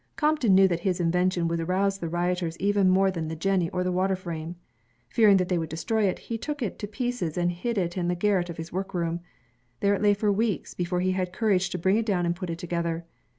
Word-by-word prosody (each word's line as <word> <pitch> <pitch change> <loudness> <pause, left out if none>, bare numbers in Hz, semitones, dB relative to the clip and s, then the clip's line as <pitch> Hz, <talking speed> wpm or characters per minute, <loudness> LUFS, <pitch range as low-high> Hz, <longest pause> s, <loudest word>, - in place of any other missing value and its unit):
Crompton 300 -10 +3
knew 190 0 +7
that 175 -2 -1
his 185 0 -1
invention 180 0 +1
would 165 0 -1
arouse 190 +3 0
the 170 - -3
rioters 175 -1 -1
even 200 0 +2
more 190 +1 +4
than 165 -3 -4
the 160 - -4
jenny 180 0 +1
or 180 -1 -1
the 180 - 0
water 190 +1 +1
frame. 170 -2 -6 0.5
Fearing 210 -4 +5
that 185 -1 0
they 180 -2 +1
would 160 -1 -4
destroy 210 +7 0
it, 185 - 0
he 230 -1 -5
took 290 +1 -4
it 210 - -4
to 205 - -4
pieces 220 - -3
and 175 0 +1
hid 220 +7 -3
it 175 -2 -1
in 175 -2 -1
the 175 - +1
garret 180 -1 +1
of 170 - -6
his 165 +1 -7
workroom. 175 -3 -2 0.6
There 200 0 +3
it 200 - -1
lay 205 -1 +4
for 210 0 +1
weeks, 210 0 -1
before 180 0 -1
he 185 +1 +1
had 185 -1 -1
courage 195 -2 +1
to 180 - -3
bring 190 +4 +2
it 225 - 0
down 180 -4 +1
and 170 0 0
put 180 -1 -6
it 165 - -3
together. 170 -1 -3
185 Hz, 245 wpm, -26 LUFS, 175-200 Hz, 0.6 s, knew